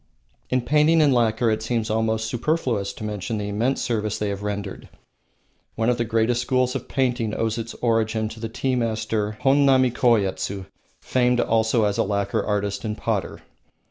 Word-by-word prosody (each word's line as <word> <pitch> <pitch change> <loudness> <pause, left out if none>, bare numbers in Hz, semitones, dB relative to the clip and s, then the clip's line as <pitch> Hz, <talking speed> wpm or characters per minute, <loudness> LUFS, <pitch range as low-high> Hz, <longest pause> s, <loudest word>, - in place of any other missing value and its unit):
In 130 0 +1
painting 150 +5 +3
and 145 -3 +5
lacquer 115 -1 +2
it 110 - -1
seems 110 -1 -1
almost 110 0 0
superfluous 120 -5 -1
to 110 - -9
mention 105 +1 -3
the 105 -1 -3
immense 115 +6 0
services 110 -3 -1
they 105 - -2
have 100 0 -4
rendered. 105 -1 -5 0.9
One 115 +1 +1
of 120 - -2
the 115 - +1
greatest 115 +2 +1
schools 125 0 +1
of 135 -3 -5
painting 120 -5 0
owes 115 0 -1
its 115 +1 -6
origin 110 -1 +1
to 110 - -10
the 115 0 -4
tea 130 +3 -1
master 110 -2 -1
Honnami 135 -2 +4
Koyetsu, 100 -5 +1 0.4
famed 125 -1 +2
also 110 0 +2
as 105 -1 0
a - - +4
lacquer 100 0 -1
artist 100 -1 -2
and 105 -2 -3
potter. - - -3
115 Hz, 175 wpm, -23 LUFS, 105-125 Hz, 0.9 s, and